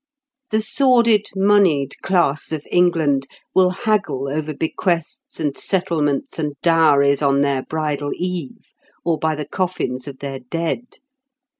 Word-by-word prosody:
The 215 0 +1
sordid 235 -3 +3
moneyed 190 -8 +3
class 170 -7 +1
of 155 -2 -4
England 160 -6 +2 0.3
will 185 -1 +5
haggle 195 - -1
over 155 +2 -2
bequests 165 +2 -2
and 145 -3 -1
settlements 160 -7 -1
and 150 -2 -2
dowries 145 -4 +4
on 140 -1 +3
their 140 -2 +1
bridal 150 -1 -3
eve, 180 -5 -5 0.4
or 165 -2 +1
by 160 -1 0
the 150 0 -5
coffins 150 -9 -3
of 135 -2 -8
their 135 -1 -6
dead. 165 - -3
160 Hz, 130 wpm, -20 LUFS, 140-185 Hz, 0.4 s, will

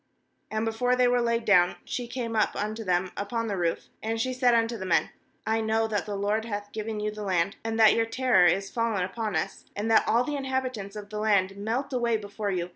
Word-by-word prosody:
8And 215 +1 -1
before 245 +3 +1
they 250 0 +4
were 245 0 +3
laid 235 -1 0
down, 180 -3 +5
she 245 -1 -4
came 235 -2 -4
up 215 - +2
unto 215 +2 -3
them 180 -1 0
upon 230 +3 -2
the 210 -3 -2
roof; 170 -2 -1 0.2
9and 225 +1 -2
she 255 +3 0
said 250 -1 +3
unto 230 0 +1
the 200 - -6
men: 185 -2 +1 0.3
'I 225 +1 +1
know 220 0 +1
that 210 -2 -2
the 205 -1 -3
LOBD 210 +2 0
hath 205 -2 -5
given 215 0 -4
you 210 0 -1
the 215 0 -8
land, 190 -1 0
and 225 0 -2
that 220 -1 +7
your 230 0 +1
terror 250 -6 +4
is 195 +3 +1
fallen 230 -5 0
upon 215 +1 -3
us, 160 - -3
and 215 +2 -1
that 220 - +5
all 235 +2 +3
the 295 +3 -3
inhabitants 255 -7 -3
of 205 0 -8
the 210 - -4
land, 200 -3 +2
melt 235 +7 -3
away 235 -2 +1
before 205 0 -4
you. 180 -2 -2
220 Hz, 235 wpm, -27 LUFS, 200-235 Hz, 0.3 s, that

